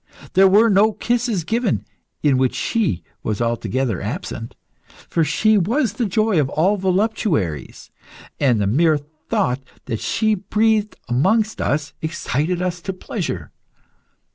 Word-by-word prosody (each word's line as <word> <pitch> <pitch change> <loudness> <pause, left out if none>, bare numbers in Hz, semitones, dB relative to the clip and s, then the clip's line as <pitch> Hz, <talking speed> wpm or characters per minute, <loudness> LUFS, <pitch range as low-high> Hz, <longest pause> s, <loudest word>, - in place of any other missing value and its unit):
There 195 +1 +6
were 210 +4 +5
no 210 +1 +4
kisses 235 -5 0
given 225 +4 0 0.4
in 140 -4 +3
which 130 -1 +1
she 205 - 0 0.2
was 105 -2 -2
altogether 115 -2 -1
absent, - - -5 0.5
for 165 - +1
she 215 +8 +3
was 225 - +1
the 225 0 -1
joy 215 -2 +2
of 135 - -1
all 175 +8 +2
voluptuaries, 190 - -1 0.5
and 125 -6 +3
the 100 - +1
mere 155 +9 +3
thought 145 -3 -2 0.2
that 115 - -3
she 220 -1 +1
breathed 210 +2 +1
amongst 210 - +1
us 145 0 -1
excited 160 +2 -1
us 180 -1 -2
to 190 - -4
pleasure." 165 - -5
180 Hz, 135 wpm, -21 LUFS, 135-215 Hz, 0.5 s, There